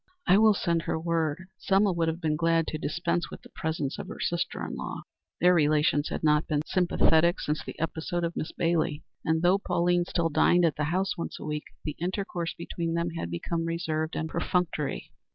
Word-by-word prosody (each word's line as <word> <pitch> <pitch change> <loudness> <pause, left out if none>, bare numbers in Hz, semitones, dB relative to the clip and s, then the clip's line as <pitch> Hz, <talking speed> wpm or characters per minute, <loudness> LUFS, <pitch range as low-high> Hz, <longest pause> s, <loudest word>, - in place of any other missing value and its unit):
"I 190 - +6
will 215 -1 +6
send 170 -2 +1
her 160 - -2
word." 165 +1 -1
Selma 195 +1 +3
would 165 -1 0
have 160 +1 -1
been 155 -3 0
glad 165 +1 +2
to 155 - -4
dispense 170 +3 -1
with - - -10
the - - -14
presence 155 -3 -2
of - - -5
her - - -8
sister 170 0 -1
in - - -5
law. - - -5 0.4
Their 180 +1 +5
relations 150 -2 +3
had - - -4
not 150 0 +3
been 150 -1 0
sympathetic 170 -1 +3
since 150 +1 -2
the - - -8
episode 165 +2 -2
of 170 0 -2
Miss 155 - -3
Bailey, 165 -3 0 0.2
and, 160 +1 +1
though 185 +3 +4
Pauline 175 -2 +1
still 170 -2 0
dined 175 +3 +4
at 160 - +1
the 150 - -1
house 185 +4 -1
once - - -4
a - - -7
week, 150 0 -3 0.2
the 150 - -3
intercourse 180 -1 -3
between 170 0 -3
them 170 0 0
had 165 - -4
become 165 - -2
reserved 160 -1 -2
and 160 - -2
perfunctory. 165 -4 -1
165 Hz, 205 wpm, -28 LUFS, 155-175 Hz, 0.4 s, I